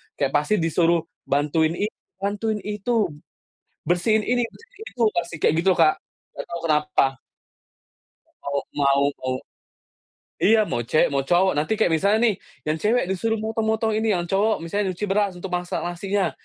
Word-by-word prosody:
Kayak 140 -2 0
pasti 210 +8 0
disuruh 165 0 +2 0.2
bantuin 155 +3 +1
ini, 210 +4 -2 0.3
bantuin 210 +2 -1
itu, 210 +2 -3 0.9
bersihin 200 +6 +2
ini, 245 0 +1
bersihin 460 -1 -15
itu, 245 - -7
pasti 170 -1 -2
kayak 150 - +2
gitu 190 - +2
loh, - - -8
Kak. 155 - +4 0.4
Enggak - - -6
tahu 170 - -4
kenapa. 150 -6 +2 1.4
Mau 140 0 -1 0.2
mau 140 -1 +3 0.2
mau. 130 0 -1 1.1
Iya. 220 +2 +5
Mau 120 - -1
cewek, 155 +7 +3
mau 135 -1 +1
cowok. 180 +5 +3
Nanti 150 +8 +1
kayak 220 - +3
misalnya 200 +7 +3
nih, - - -5 0.3
yang 155 +1 +1
cewek 230 +6 +2
disuruh 225 +4 -1
motong-motong 220 0 0
ini, 220 -1 +1
yang 175 - -1
cowok 205 +3 +1
misalnya 190 +3 -1
nyuci 185 +3 -3
beras 200 -1 +1
untuk 180 +1 -7
masak 180 0 -2
nasinya, 190 +3 -1
190 Hz, 160 wpm, -23 LUFS, 160-215 Hz, 1.4 s, Iya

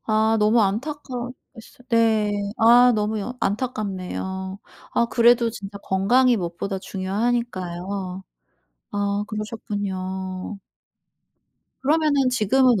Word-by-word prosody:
아 220 0 +3
너무 215 +2 +4
안타까웠겠어 250 +2 -5
네. 225 -2 +3 0.3
아 240 +2 +7
너무 215 0 0
여 250 +5 -5
안타깝네요. 190 -3 -3 0.3
아 235 - +2
그래도 235 0 +4
진짜 200 -2 -8
건강이 235 +7 +3
무엇보다 190 +1 -3
중요하니까요. 190 -2 -3 0.7
아 205 0 0
그러셨군요. 195 -3 -4 1.2
그러면은 290 -2 +3
지금은 250 0 +3
215 Hz, 240 characters per minute, -23 LUFS, 195-240 Hz, 1.2 s, 아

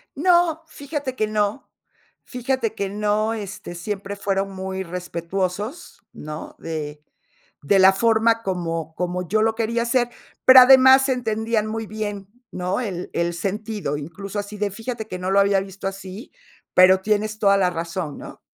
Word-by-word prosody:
No, 345 0 +3
fíjate 285 -3 -5
que 215 -3 0
no. 210 +3 -1 0.5
Fíjate 250 -2 -2
que 200 -2 -2
no, 210 +2 0
este, 200 -4 -7
siempre 200 +3 -5
fueron 195 -1 -1
muy 190 0 -5
respetuosos, 180 - -4
¿no?, 150 +1 -8
de 150 -2 -5 0.6
de 195 +7 +3
la 190 0 +7
forma 230 +2 +2
como 165 -4 -3
como 180 0 -3
yo 215 +5 +1
lo 220 0 +2
quería 230 +1 -1
hacer, 240 0 +1 0.4
pero 260 0 +10
además 265 +1 +7
entendían 220 -3 -1
muy 225 0 -4
bien, 205 -2 -5 0.2
¿no?, 185 +4 -2
el 185 -6 -5
el 170 0 0
sentido, 200 -4 -3
incluso 190 +7 -6
así 205 +1 -6
de, 205 -1 -1
fíjate 225 +1 -6
que 185 -2 -6
no 185 +1 -2
lo 200 - +4
había 200 0 +4
visto 195 0 -6
así, 195 - -8 0.4
pero 185 +1 +6
tienes 215 +1 0
toda 200 -2 +4
la 185 -2 +2
razón, 170 -2 -4
¿no? - - -11
205 Hz, 155 wpm, -22 LUFS, 185-225 Hz, 0.6 s, pero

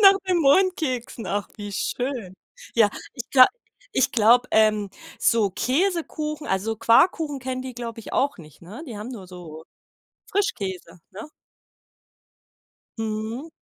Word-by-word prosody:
Nach 390 -1 +8
den 360 -2 +3
Mondkeksen, 280 -7 +1
ach 205 0 -2
wie 205 -1 -7
schön. 245 -2 -3 0.4
Ja, 225 -3 +5 0.3
ich 245 -3 -7
gla 255 -2 +9 0.5
ich 260 - +3
glaube, 240 +2 +4
ähm, 215 -2 +3 0.3
so 220 -4 +3
Käsekuchen, 305 - -1
also 210 +4 -1
Quarkkuchen, 285 - +3
kennen 255 0 -4
die, 260 -1 -7
glaube 235 -1 -6
ich, - - -11
auch 280 -3 +1
nicht, 155 -1 -15
ne? 205 - -9
Die 235 -6 -7
haben 210 +3 -6
nur 205 -7 -8
so 165 -3 -10 0.7
Frischkäse, 190 - -2
ne? 215 +10 -9 1.7
Mhm. 220 +6 -4
235 Hz, 130 wpm, -24 LUFS, 205-280 Hz, 1.7 s, gla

